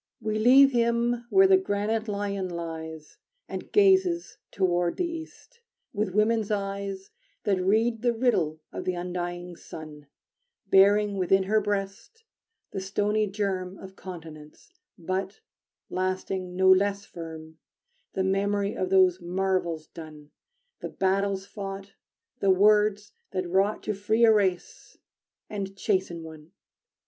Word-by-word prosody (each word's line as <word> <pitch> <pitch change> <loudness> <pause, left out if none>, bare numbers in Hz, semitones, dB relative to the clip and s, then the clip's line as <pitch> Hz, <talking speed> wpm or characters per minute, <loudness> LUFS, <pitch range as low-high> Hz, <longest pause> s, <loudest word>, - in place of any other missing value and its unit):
We 215 0 -2
leave 270 +4 +7
him 235 0 +1
where 385 +5 +6
the 380 0 +6
granite 220 - -1
Lion 200 -2 -2
lies 160 -2 -7 0.3
And - - -7
gazes 380 -4 +3
toward 175 -2 0
the 360 - 0
East, 335 +8 -9 0.3
with 205 -3 -2
woman's 215 0 +2
eyes 195 -1 -3 0.3
That 195 -3 +1
read 220 +4 +1
the 240 -1 +2
riddle 185 -11 0
of - - -5
the 185 - -1
undying 175 0 -5
sun, 150 -3 -11 0.6
Bearing 200 +1 +4
within 190 +1 +3
her 215 +3 +2
breast 205 - -4 0.5
the 195 - -4
stony 210 +2 0
germ 190 -2 -3
Of 190 0 -11
continents, 160 - -11 0.2
but 185 +4 -4 0.5
lasting 185 0 -3
no 190 0 +5
less 200 +1 +2
firm 160 -1 -10 0.5
The 190 - 0
memory 200 +1 0
of 185 - -2
those 185 -1 +4
marvels 175 -3 -1
done, 155 -2 -12 0.5
The - - -5
battles 195 0 0
fought, 195 -1 -7 0.5
the 195 - +1
words 210 +1 +3 0.2
that 185 -1 -2
wrought 195 +4 +1
To 215 - -1
free 215 +4 +2
a 225 - +6
race, 190 -4 -1 0.5
and 195 -2 -5
chasten 185 -5 -1
one. 160 +1 -12
195 Hz, 130 wpm, -27 LUFS, 180-210 Hz, 0.6 s, leave